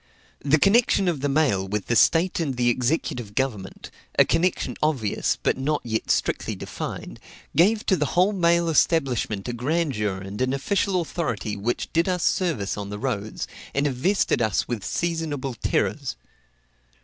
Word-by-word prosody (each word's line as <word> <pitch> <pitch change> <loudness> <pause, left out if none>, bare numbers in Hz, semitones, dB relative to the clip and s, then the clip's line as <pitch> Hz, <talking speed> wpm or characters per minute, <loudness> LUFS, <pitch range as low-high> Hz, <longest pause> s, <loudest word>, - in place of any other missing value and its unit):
The 145 +2 +4
connection 200 +2 +3
of 165 -6 0
the 145 - 0
mail 135 -10 +2
with 105 +1 -2
the 120 - 0
state 170 - +4
and 140 -6 -2
the 120 -1 +3
executive 120 -4 -1
government 110 -8 -3 0.3
a - - +7
connection 170 +2 0
obvious, 135 -9 0
but - - +1
yet 130 - -5
not 150 +1 0 0.3
strictly - - 0
defined - - -6 0.4
gave 210 +6 +3
to 190 - +3
the 150 -4 0
whole 185 +4 +4
mail 170 -2 +3
establishment 135 - +1
a 120 - -2
grandeur 125 - -1
and 95 +4 -7
an 130 +1 +1
official 190 +5 0
authority 115 - -3
which 110 +4 -3
did 165 +3 +2
us 180 -1 0
service 150 - 0
on 100 -1 -5
the 105 - -5
roads, 110 -3 -3 0.3
and 140 +1 +1
invested 145 +3 +1
us 110 -4 +1
with 115 -5 -3
seasonable 160 -6 -2
terrors. 120 +4 -1
140 Hz, 160 wpm, -24 LUFS, 110-170 Hz, 0.4 s, a